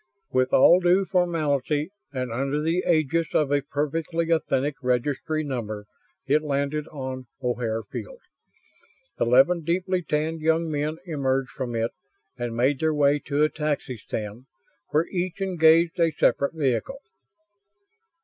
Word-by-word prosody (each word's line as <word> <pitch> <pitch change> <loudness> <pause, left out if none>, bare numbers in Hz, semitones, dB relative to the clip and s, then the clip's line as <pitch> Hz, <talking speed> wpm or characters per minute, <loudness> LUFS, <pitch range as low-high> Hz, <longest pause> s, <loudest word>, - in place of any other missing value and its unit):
With 130 0 +1
all 175 +7 +7
due 185 +2 +3
formality 155 -4 0 0.2
and 130 -3 -3
under 135 +5 -1
the 165 +4 0
aegis 165 0 +1
of 145 -2 +2
a 145 0 +3
perfectly 160 +4 -2
authentic 145 -3 +1
Registry 140 +5 -1
Number 110 -7 -4 0.4
it 150 +3 +3
landed 145 0 -2
on 130 -3 -6 0.2
O'Hare 115 -2 -1
Field. - - -8 1.0
Eleven 135 +9 +4
deeply 180 +3 0
tanned 155 0 -2
young 160 +1 +1
men 150 +2 -2
emerged 135 -5 -1
from 125 -3 -4
it 115 0 0 0.4
and 120 -2 -4
made 130 +3 +2
their 160 -1 +1
way 145 0 +3
to 145 0 +1
a 155 - +4
taxi 150 -5 -2
stand, 110 +3 -6 0.4
where 155 +3 +1
each 180 0 -3
engaged 170 -3 +3
a 165 -1 +4
separate 150 0 +1
vehicle. 145 - -1
150 Hz, 135 wpm, -25 LUFS, 130-165 Hz, 1.0 s, all